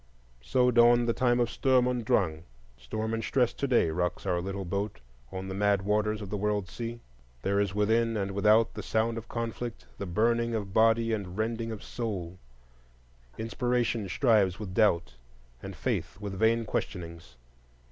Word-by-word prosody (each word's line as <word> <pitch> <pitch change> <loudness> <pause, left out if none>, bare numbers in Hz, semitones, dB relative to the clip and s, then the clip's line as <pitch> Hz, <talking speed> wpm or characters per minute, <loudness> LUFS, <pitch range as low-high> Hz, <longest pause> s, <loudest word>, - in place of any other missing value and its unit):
So 125 - +2
dawned 120 0 +5
the 115 - +2
time 120 0 +2
of 120 -1 +1
Sturm 130 -2 +3
und 125 -1 -1
Drang: 80 -7 +1 0.3
storm 110 - -4
and 115 0 -2
stress 125 0 +1
to 140 - -2
day 120 -11 +3
rocks 90 +4 -2
our 90 -2 0
little 95 +1 -4
boat 100 - -3 0.3
on 95 0 -5
the 95 - -4
mad 100 0 +2
waters 105 +1 0
of 95 - -8
the 105 - -1
world 105 -1 -1
sea; 115 +2 -6 0.4
there 100 +1 +1
is 100 -1 0
within 115 +2 +2
and 100 -1 -2
without 105 +3 +3
the - - -5
sound 115 +1 0
of 115 - -14
conflict, 115 0 -4
the 100 - -4
burning 115 +5 +1
of 100 -3 -4
body 115 +1 +3
and 95 -3 -4
rending 115 +1 -2
of 110 - -7
soul; 95 -7 -5 1.0
inspiration 115 -1 -1
strives 105 -7 +3
with 100 -4 -6
doubt, 85 - +2 0.5
and - - -7
faith - - -3
with 100 -2 -5
vain 110 +3 +2
questionings. 85 -10 -5
105 Hz, 170 wpm, -29 LUFS, 95-115 Hz, 1.0 s, dawned